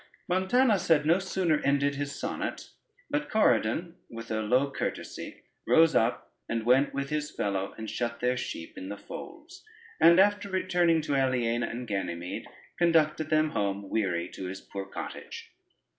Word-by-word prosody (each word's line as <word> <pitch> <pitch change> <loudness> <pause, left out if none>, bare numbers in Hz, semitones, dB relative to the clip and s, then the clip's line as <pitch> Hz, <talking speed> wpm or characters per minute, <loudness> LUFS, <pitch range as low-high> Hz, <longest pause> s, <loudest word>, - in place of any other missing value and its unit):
] - - -39
Montanus 190 +3 +2
had 150 -3 +4
no 170 +4 +4
sooner 185 -5 0
ended 140 0 +2
his 140 0 -4
sonnet, - - -4 0.4
but 295 +1 -1
Corydon 165 - +2
with 115 -1 -8
a 110 0 0
low 125 +6 +2
courtesy - - -5 0.2
rose 165 0 +5
up 115 +2 +1 0.2
and 115 -1 -2
went 130 +4 +4
with 140 +1 -4
his 150 0 -1
fellow, 100 -1 -2
and 110 - -6
shut 115 +1 -3
their 125 +1 +1
sheep 80 -9 -6
in 95 - -7
the 105 - -5
folds; 350 - -10 0.4
and 170 +2 +7
after 205 +1 +3
returning 175 -3 +2
to 145 -2 -1
Aliena 120 -3 +1
and 125 +2 -5
Ganymede, 90 -4 -4 0.3
conducted 160 -3 +3
them 155 0 +2
home 100 -3 -2
weary 90 -5 0
to 95 - -7
his 95 +1 -6
poor 100 -1 -7
cottage. - - -8
140 Hz, 160 wpm, -28 LUFS, 110-170 Hz, 0.4 s, and